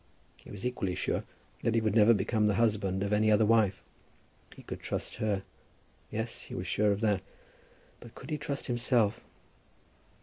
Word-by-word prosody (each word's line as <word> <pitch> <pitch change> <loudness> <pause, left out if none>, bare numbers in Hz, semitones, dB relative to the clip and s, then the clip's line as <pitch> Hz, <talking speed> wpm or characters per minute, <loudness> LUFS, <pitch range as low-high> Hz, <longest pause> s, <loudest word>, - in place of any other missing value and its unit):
He - - -16
was 105 +3 -7
equally 100 -7 -2
sure 90 - -1 0.4
that 115 - +1
he - - +4
would 110 -2 +1
never 110 0 +6
become 105 +2 +1
the 105 - +2
husband 100 -4 +1
of 100 +1 -1
any 110 +1 +3
other 105 +1 +5
wife. 105 -3 +3 0.7
He - - -13
could - - -7
trust - - -3
her. 100 -3 -1 0.7
Yes; 110 +2 -4
he - - -8
was 90 - -4
sure 105 +3 +2
of 100 +1 -1
that. 105 -4 +2 0.8
But 115 - -13
could - - -10
he 150 - -1
trust 140 -1 -3
himself? 120 -3 +1
105 Hz, 175 wpm, -30 LUFS, 100-115 Hz, 0.8 s, never